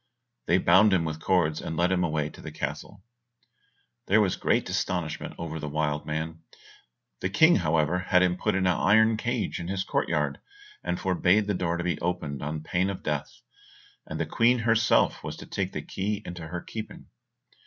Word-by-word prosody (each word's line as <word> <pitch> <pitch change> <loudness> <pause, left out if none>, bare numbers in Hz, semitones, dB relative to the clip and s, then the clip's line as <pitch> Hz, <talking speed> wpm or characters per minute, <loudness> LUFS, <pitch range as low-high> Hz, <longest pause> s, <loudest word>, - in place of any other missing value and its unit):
They 85 - +4
bound 95 +3 +5
him 85 -3 +2
with 80 -1 -4
cords, 80 -3 +1
and 80 - -5
led 90 +2 +2
him 90 -1 +2
away 75 -3 -1
to - - -13
the - - -7
castle. 100 -1 -6 1.0
There 105 +3 +5
was 100 -4 +2
great - - +1
astonishment 85 -4 -2
over 80 -1 -5
the 75 - -5
wild 75 0 -1
man; 80 +1 -4 0.8
the 95 - -1
King, 160 - +5
however, 80 +2 +1
had 90 0 +3
him 90 -1 +2
put 105 +2 -1
in 95 -1 +1
an 90 -2 +3
iron 110 +2 +4
cage 110 - -2
in 85 - -5
his 95 0 -1
court - - -1
yard, - - 0 0.4
and - - -2
forbade 95 +2 +2
the 105 - 0
door 85 -2 -1
to 85 - -3
be 90 - -1
opened 85 -6 -2
on 75 +1 -4
pain 90 +4 0
of 95 - -6
death, 75 -2 -3 0.7
and - - -5
the - - 0
Queen 120 +2 +3
herself 115 -1 +2
was - - -5
to - - -9
take - - -3
the - - -5
key 105 +2 -3
into 85 -2 -7
her 85 +2 -5
keeping. 110 -1 -8
90 Hz, 195 wpm, -27 LUFS, 80-100 Hz, 1.0 s, bound